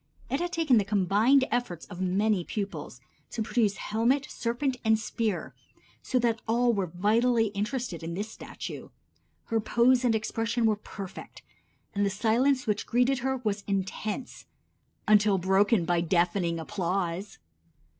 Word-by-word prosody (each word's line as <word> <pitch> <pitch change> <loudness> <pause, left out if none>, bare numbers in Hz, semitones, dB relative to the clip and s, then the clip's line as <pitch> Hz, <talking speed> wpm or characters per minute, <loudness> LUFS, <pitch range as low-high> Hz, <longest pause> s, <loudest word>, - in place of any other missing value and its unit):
It 275 - +1
had 350 +1 -2
taken 315 -9 +3
the - - +1
combined 210 +7 +3
efforts 210 -9 -2
of 180 -2 -8
many 190 +1 +1
pupils 170 - -5 0.3
to 225 - -3
produce 215 -3 +1
helmet, 240 +6 +1
serpent 250 +3 -1
and 220 -1 +4
spear, 215 -3 -2 0.5
so 255 - -1
that 235 -2 +1
all 240 +1 +3
were 195 -4 -1
vitally 225 +6 +2
interested 210 -2 -3
in 165 +1 -5
this 205 +3 -3
statue. - - -8 0.6
Her 225 - 0
pose 245 +3 +3
and 235 -3 +3
expression 225 +2 -1
were 215 -1 +3
perfect, 195 -2 -9 0.5
and 205 - 0
the 200 - +2
silence 235 +7 +2
which 210 -2 -1
greeted 250 +2 +2
her 265 +2 -1
was 205 -2 -1
intense 200 +5 -3 0.6
until 210 -1 +5
broken 190 +1 +3
by 175 0 +1
deafening 170 0 +1
applause. 185 +1 -3
215 Hz, 145 wpm, -28 LUFS, 195-240 Hz, 0.6 s, until